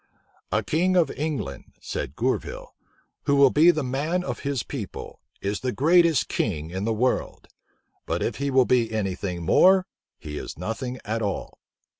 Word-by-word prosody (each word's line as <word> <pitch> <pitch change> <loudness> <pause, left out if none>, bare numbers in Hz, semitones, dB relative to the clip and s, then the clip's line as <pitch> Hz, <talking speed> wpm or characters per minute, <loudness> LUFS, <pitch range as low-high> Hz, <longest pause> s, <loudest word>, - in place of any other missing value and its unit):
"A - - +1
king 180 +4 +1
of 170 -6 +3
England," 145 - -4
said - - -5
Gourville, - - -2 0.5
"who 140 - +3
will 140 -2 +6
be 160 +4 +6
the 155 -4 +2
man 150 +8 -1
of - - -4
his 140 -4 -2
people, - - -7 0.2
is 100 +1 -2
the 130 - -2
greatest 165 +2 +4
king 80 -6 -2
in 95 +3 -3
the 115 - +1
world; 125 +4 -1 0.6
but - - -1
if - - -2
he 140 0 -1
will 130 -1 +4
be 120 -3 +2
any 105 -4 -1
thing 90 -2 -4
more, 185 - +5 0.3
he 75 -1 -6
is - - -7
nothing 120 - -4
at 110 +2 -2
all." 100 -2 -4
130 Hz, 170 wpm, -25 LUFS, 105-155 Hz, 0.6 s, will